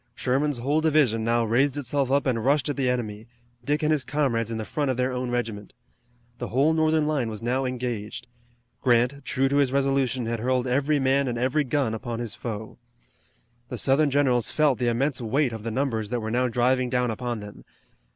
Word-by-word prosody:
Sherman's 135 +2 0
whole 140 +6 0
division 145 -8 +2
now 115 +1 +2
raised 130 +5 +2
itself 140 0 -1
up 140 +1 +2
and 120 -4 0
rushed 140 0 +2
at 145 - -1
the 135 -3 0
enemy, 110 -3 -3 0.4
Dick 145 +4 0
and 155 - +2
his 150 -4 +2
comrades 125 -6 0
in 115 - -3
the 110 - -4
front 145 +6 -2
of 130 - -1
their 125 +1 0
own 125 0 -3
regiment. 115 -4 -4 0.6
The - - -3
whole 140 +6 +2
Northern 160 -1 +2
line 145 -6 0
was 110 0 -7
now 130 +3 0
engaged. 120 -4 -4 0.6
Grant, 125 +2 +2
true 135 0 +1
to 140 +1 +1
his 140 -3 +3
resolution, 135 -3 +1
had 115 0 -2
hurled 125 +2 0
every 140 +4 +1
man 135 0 +2
and 120 -1 -2
every 130 +5 +1
gun 135 -4 0
upon 115 +1 -4
his 120 -3 -4
foe. 110 -1 -6 0.9
The 125 - -4
Southern 140 +5 +3
generals 130 -4 +2
felt 150 -4 +2
the 125 - 0
immense 130 +3 0
weight 125 +3 0
of 110 - -6
the 115 - -4
numbers 115 -4 -1
that 120 - -1
were 110 -1 -4
now 125 +2 +2
driving 125 +1 +1
down 125 -1 +1
upon 120 0 -3
them. 105 0 -10
125 Hz, 205 wpm, -25 LUFS, 115-140 Hz, 0.9 s, his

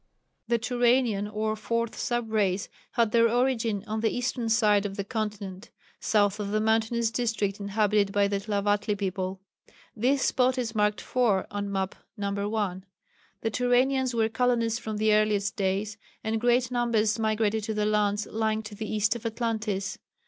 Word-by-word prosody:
The 235 +1 +2
Turanian 240 -3 +2
or 215 0 -1
4th 230 +1 -2
sub 240 -2 -2
race 200 -2 +1 0.2
had 230 -3 +2
their 230 0 +4
origin 235 -4 +1
on 220 0 -3
the 225 0 +2
eastern 245 -1 -2
side 210 -3 +4
of 200 -1 -5
the 200 - -1
continent, 210 -3 -5 0.3
south 205 -1 +2
of 205 -1 -3
the 215 +1 +1
mountainous 225 +1 +1
district 220 -5 -1
inhabited 205 0 +1
by 200 0 +3
the 200 0 -1
Tlavatli 205 0 0
people. 190 -1 -3 0.5
This 255 +5 +2
spot 255 0 +2
is 235 -3 -2
marked 210 -1 +1
4 225 -7 +1
on 205 0 -3
Map 190 -1 -1 0.2
No. 200 0 -2
1. 200 -4 -2 0.6
The 225 - -1
Turanians 250 +2 +2
were 225 -1 +3
colonists 230 0 +1
from 215 -1 -4
the 215 0 +3
earliest 210 -1 +2
days, 200 +2 -1 0.2
and 220 0 -1
great 245 +1 +2
numbers 230 -3 +1
migrated 220 0 +1
to 220 -1 -3
the 210 0 +1
lands 210 -1 +1
lying 220 0 -1
to 215 0 -9
the 215 +1 -5
east 215 +1 +1
of 235 - -7
Atlantis. 220 -4 -2
215 Hz, 165 wpm, -27 LUFS, 205-230 Hz, 0.6 s, their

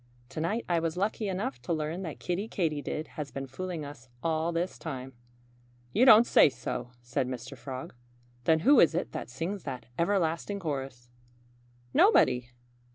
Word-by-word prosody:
To 155 - -5
night 210 +8 -1
I 175 -2 +2
was 165 +1 -2
lucky 210 +2 -1
enough 180 - -3
to 125 - -5
learn 155 +3 -2
that 165 -5 -6
Kiddie 185 +4 -2
Katydid 155 -5 -2
has 150 -2 -6
been 135 0 -5
fooling 165 +3 -5
us 135 -3 -11
all 160 0 +1
this 170 +2 -2
time." 135 -5 -6 0.8
"You 250 - +5
don't 235 -2 +9
say - - +6
so!" 125 -2 -5
said 125 +2 -1
Mr. 130 +1 -6
Frog. 130 0 -7 0.5
"Then 160 -1 +4
who 275 - +6
is 165 - +5
it 175 - -1
that - - -5
sings 170 +10 -4
that 130 -2 -5
everlasting 175 +2 0
chorus?" 135 -7 -5 0.8
"Nobody!" 125 -1 +5
160 Hz, 160 wpm, -29 LUFS, 135-180 Hz, 0.8 s, don't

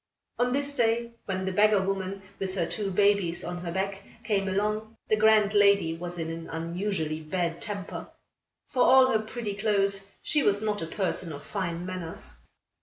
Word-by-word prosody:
On 245 0 +2
this 285 +2 0
day, 235 0 +1
when 190 -1 -2
the 190 - -1
beggar 210 +2 +4
woman, 195 0 -2 0.2
with 190 -1 -3
her 175 -3 +1
two 195 +4 -2
babies 195 -3 +2
on 175 0 -4
her 175 -1 -4
back, 195 +2 -2 0.2
came 200 -3 0
along, 210 +3 -1
the 215 - +5
grand 215 -1 +5
lady 200 -5 +5
was 175 +1 -6
in 165 -1 -3
an 165 0 -7
unusually 165 -1 -2
bad 170 +1 -2
temper. 200 -2 -4 0.6
For 255 - +1
all 260 0 +7
her 220 - +3
pretty 220 -1 -4
clothes, 200 -1 +1 0.2
she 300 - +2
was 205 -5 +3
not 210 -1 -1
a 165 - -3
person 180 -2 -2
of 145 -1 -8
fine 175 -3 -3
manners. 180 - -5
195 Hz, 180 wpm, -28 LUFS, 175-215 Hz, 0.6 s, all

